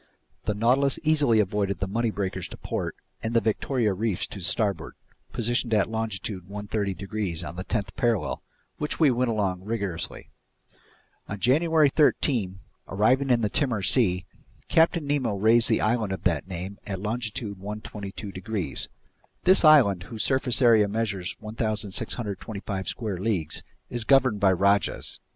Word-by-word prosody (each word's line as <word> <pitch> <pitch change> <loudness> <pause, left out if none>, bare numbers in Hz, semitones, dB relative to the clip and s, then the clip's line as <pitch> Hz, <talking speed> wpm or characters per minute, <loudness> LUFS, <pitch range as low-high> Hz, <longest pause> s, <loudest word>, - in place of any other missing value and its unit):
The 105 - 0
Nautilus 130 +5 +2
easily 150 -8 +3
avoided 100 -1 0
the 95 - 0
Money 115 +4 0
breakers 100 -3 -3
to - - -10
port - - -4 0.3
and 115 +1 -3
the - - +7
Victoria 115 0 0
reefs 105 -1 -1
to 100 - -9
starboard, 100 +2 -1 0.4
positioned 120 -1 0
at 105 +1 +1
longitude 105 -4 -4
130 100 -1 -3
degrees 100 -4 -4
on 85 +1 -7
the 95 - -5
tenth 100 0 -3
parallel, 120 -5 0 0.4
which 150 - -2
we 155 -5 +5
went 125 0 +1
along 100 -5 -1
rigorously. 100 -5 -4 1.0
On 105 - -4
January 155 - +4
13, 120 - +2 0.3
arriving 125 +8 +2
in 120 -2 +3
the 110 - +2
Timor 120 -6 0
Sea, 95 -6 +2 0.4
Captain 165 -1 +3
Nemo 135 -7 0
raised 115 +3 +4
the - - +2
island 110 -2 +1
of 95 - -6
that 85 0 0
name 95 +2 -6
at 95 -2 -3
longitude 110 -1 -3
122 100 0 -7
degrees. 95 - -4 0.5
This 185 0 +5
island, 135 - +6
whose 110 -2 -4
surface 130 -1 +1
area 110 -3 +6
measures 100 -3 -2
1,625 105 -2 -4
square 105 -6 -3
leagues, 95 -7 -1 0.3
is 120 -2 -2
governed 130 -4 +4
by 100 -2 +5
rajahs. 100 0 +1
110 Hz, 145 wpm, -26 LUFS, 100-120 Hz, 1.0 s, the